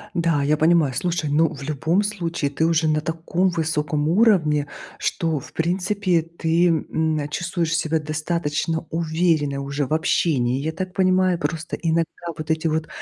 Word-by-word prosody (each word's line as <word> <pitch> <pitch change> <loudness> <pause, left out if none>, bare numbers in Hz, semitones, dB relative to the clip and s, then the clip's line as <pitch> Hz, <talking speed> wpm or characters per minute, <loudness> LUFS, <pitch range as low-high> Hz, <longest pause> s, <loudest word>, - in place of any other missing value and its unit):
Да, 165 -4 +1
я 150 +2 +2
понимаю. 160 -4 +3
Слушай, 170 0 -1
ну 155 +2 +2
в 140 - -10
любом 155 +6 0
случае 170 -8 -2
ты 160 +3 0
уже 160 -1 +2
на 155 0 +1
таком 165 +4 0
высоком 150 -2 -1
уровне, 165 -8 +3 0.3
что 165 -3 -1
в - - -13
принципе 180 +1 0
ты, 165 +1 +1
м, 160 -2 0
чувствуешь 170 0 -1
себя 160 -1 0
достаточно 155 +1 -2
уверенной 160 -3 0
уже 140 +1 -2
в 140 - -3
общении, 140 -6 +1
я 155 +3 -2
так 185 +2 -5
понимаю. 185 -1 +3
Просто 155 +2 -3
иногда 165 -1 +1 0.3
вот 155 0 -6
эти 160 +1 0
вот 160 0 -1
160 Hz, 155 wpm, -22 LUFS, 150-170 Hz, 0.3 s, понимаю